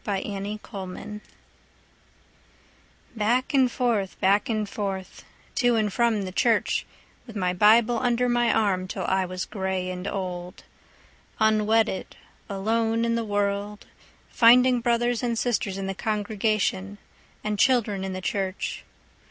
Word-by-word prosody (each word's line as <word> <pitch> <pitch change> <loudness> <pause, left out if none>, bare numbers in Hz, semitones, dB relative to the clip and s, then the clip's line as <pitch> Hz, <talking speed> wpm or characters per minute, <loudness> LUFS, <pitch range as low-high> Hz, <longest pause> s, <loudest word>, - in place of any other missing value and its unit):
Lydia 200 +1 -3
Humphrey 200 +1 -7 1.9
Back 235 +6 +1
and 260 -3 +4
forth, 225 -7 -1
back 200 +4 +2
and 215 -2 -1
forth, 195 -2 -5 0.3
to 245 -2 +2
and 215 -3 0
from 230 -4 +1
the 185 - -5
church, 225 +3 +1 0.4
With 230 - -11
my 180 -3 0
Bible 220 +5 +4
under 245 0 +1
my 240 -1 +2
arm 190 -4 +1
'Till - - -4
I 190 0 +1
was 185 0 -4
gray 190 -2 -3
and 180 +1 -5
old; 180 -2 -5 0.8
Unwedded, 220 -1 +2 0.3
alone 225 +3 0
in 230 - +1
the 230 0 0
world, 205 0 -2 0.5
Finding 245 +1 +5
brothers 240 0 +1
and 235 -2 -1
sisters 210 -5 -1
in 195 - -4
the 195 - -2
congregation, 205 -1 -1 0.5
And 210 -1 -2
children 225 -7 +2
in 190 0 -3
the 185 - -5
church. 190 0 -3
210 Hz, 130 wpm, -25 LUFS, 195-230 Hz, 1.9 s, Finding